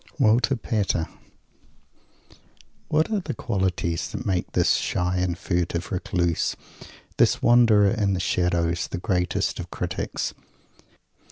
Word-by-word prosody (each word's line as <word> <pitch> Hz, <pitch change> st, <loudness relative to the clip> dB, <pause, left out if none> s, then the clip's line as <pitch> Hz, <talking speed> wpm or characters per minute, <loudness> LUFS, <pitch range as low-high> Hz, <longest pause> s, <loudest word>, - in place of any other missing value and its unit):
WALTER 125 Hz, +1 st, +3 dB
PATER 105 Hz, -8 st, -1 dB, 1.8 s
What 155 Hz, +6 st, +1 dB
are 215 Hz, -, +1 dB
the 185 Hz, -, -5 dB
qualities 95 Hz, -6 st, -1 dB
that -, -, -6 dB
make 90 Hz, -2 st, -1 dB
this -, -, +3 dB
shy 90 Hz, +1 st, 0 dB
and 90 Hz, -1 st, -1 dB
furtive 90 Hz, -2 st, -2 dB
Recluse, 85 Hz, -2 st, 0 dB, 0.6 s
this -, -, +3 dB
Wanderer 115 Hz, -4 st, +5 dB
in 105 Hz, -4 st, +1 dB
the -, -, -2 dB
shadow, 85 Hz, -1 st, +1 dB
the 85 Hz, +1 st, -3 dB
greatest 90 Hz, +1 st, -1 dB
of 90 Hz, -1 st, -6 dB
critics? 90 Hz, 0 st, -3 dB
95 Hz, 115 wpm, -24 LUFS, 90-110 Hz, 1.8 s, Wanderer